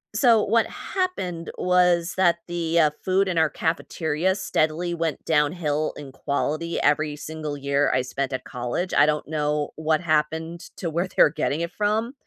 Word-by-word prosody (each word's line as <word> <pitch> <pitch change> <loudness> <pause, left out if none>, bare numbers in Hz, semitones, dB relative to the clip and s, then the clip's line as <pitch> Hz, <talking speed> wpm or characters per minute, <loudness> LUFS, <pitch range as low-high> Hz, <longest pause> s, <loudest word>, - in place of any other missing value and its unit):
So 235 -5 +5
what 230 +2 +2
happened 185 - -3
was 180 -1 +2
that 175 -2 +4
the, 170 -1 0
uh, 155 -2 +4
food 190 +1 +2
in 175 -2 -1
our 160 -1 +4
cafeteria 160 +1 -1
steadily 170 -2 0
went 165 -2 -3
downhill 150 0 +1
in 140 -2 -9
quality 155 +4 -2
every 150 0 +1
single 155 -1 -5
year 140 +1 +1
I 130 - +2
spent 130 +2 -3
at 130 - -4
college, 125 +9 -3
I - - +6
don't 150 -1 -1
know 150 -1 -1
what 155 0 +1
happened 160 +1 -1 0.2
to 170 - -3
where 170 +4 -1
they're - - +5
getting 155 0 -1
it 170 +1 -3
from, 215 +4 0
160 Hz, 165 wpm, -24 LUFS, 150-175 Hz, 0.2 s, I